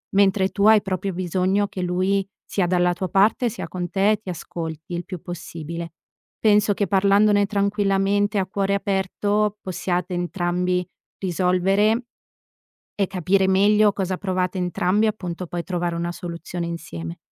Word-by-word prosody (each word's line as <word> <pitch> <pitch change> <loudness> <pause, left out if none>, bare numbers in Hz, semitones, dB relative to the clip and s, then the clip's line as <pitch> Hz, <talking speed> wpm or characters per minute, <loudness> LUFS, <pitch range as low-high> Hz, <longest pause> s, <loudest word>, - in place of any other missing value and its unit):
mentre 195 -1 +4
tu 200 - 0
hai 215 -1 +7
proprio 190 0 -3
bisogno 185 +3 0
che 190 - -6
lui 185 +2 0 0.2
sia 190 -3 0
dalla 180 0 +2
tua 185 +1 -3
parte, 205 +7 +3
sia 220 - -6
con 175 -1 -4
te, 205 +2 +2
ti 195 - -8
ascolti 165 -1 -6
il 175 - -4
più 185 -4 -7
possibile. 170 -2 -6 0.5
Penso 210 -1 +4
che 200 -1 -1
parlandone 200 +2 +4
tranquillamente 200 0 +1
a 190 - +1
cuore 195 +1 -1
aperto 205 +1 0
possiate 180 0 -2
entrambi 180 0 -1 0.3
risolvere 195 +5 +1 0.9
e 200 - +1
capire 190 +1 +1
meglio 205 +2 +4
cosa 190 -2 -2
provate 185 -1 -1
entrambi 180 +4 +1
appunto, 180 -4 -3
poi 170 +1 -4
trovare 175 -1 -2
una 170 +1 -2
soluzione 170 0 -5
insieme. 85 - -6
190 Hz, 140 wpm, -23 LUFS, 175-200 Hz, 0.9 s, hai